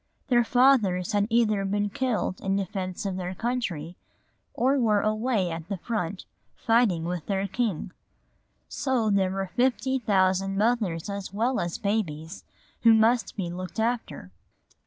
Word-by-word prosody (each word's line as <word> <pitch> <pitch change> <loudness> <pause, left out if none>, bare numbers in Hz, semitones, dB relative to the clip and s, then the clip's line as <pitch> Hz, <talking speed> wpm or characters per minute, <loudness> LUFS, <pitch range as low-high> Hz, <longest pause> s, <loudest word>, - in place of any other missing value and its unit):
Their 240 -2 +4
fathers 230 -8 +3
had 205 0 +1
either 220 -3 +2
been 205 +1 -1
killed 230 -6 -1
in 195 0 0
defence 190 0 -3
of 190 -2 -2
their 180 0 -4
country 185 -9 -3 0.6
or 265 +3 +2
were 215 -4 +3
away 215 -3 0
at 165 +1 -6
the 200 - -2
front 195 -2 -3 0.3
fighting 225 -8 +2
with 175 -2 -4
their 195 -1 0
king. 195 -4 -2 0.8
So 255 -6 0
there 195 -2 +2
were 190 -1 -3
fifty 260 +1 +1
thousand 195 -3 +1
mothers 210 -7 0
as 200 -2 -5
well 235 +6 0
as 175 -1 -2
babies 190 -6 -3 0.4
who 230 -1 +7
must 225 0 +2
be 175 -4 -3
looked 185 +4 -6
after. 220 - -2
200 Hz, 145 wpm, -26 LUFS, 185-235 Hz, 0.8 s, who